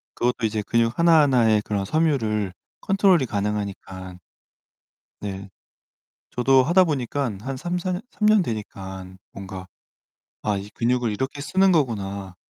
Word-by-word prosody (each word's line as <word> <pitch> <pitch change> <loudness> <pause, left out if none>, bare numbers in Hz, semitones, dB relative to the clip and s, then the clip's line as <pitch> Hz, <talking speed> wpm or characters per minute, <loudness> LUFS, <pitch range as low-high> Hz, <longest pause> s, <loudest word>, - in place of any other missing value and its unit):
그것도 125 -1 0
이제 110 0 -1
근육 115 +2 +1
하나하나의 135 -10 +4
그런 100 -2 -2
섬유를 110 - 0 0.3
컨트롤이 190 -6 +3
가능하니까 100 -3 -4 1.0
네 100 -1 -6 0.8
저도 130 +2 +4
하다 175 +7 +4
보니깐 135 - -2
한 130 +4 -5
3-4 175 +5 -2
년 180 - -2
3 210 - -1
년 215 -2 +5
되니깐 95 - -6
뭔가 95 -1 -8 0.8
'아 105 -2 0
이 100 +1 -7
근육을 120 -1 0
이렇게 130 +7 -3
쓰는 190 +6 +3
거구나.' 100 - -1
115 Hz, 265 characters per minute, -23 LUFS, 100-145 Hz, 1.0 s, 년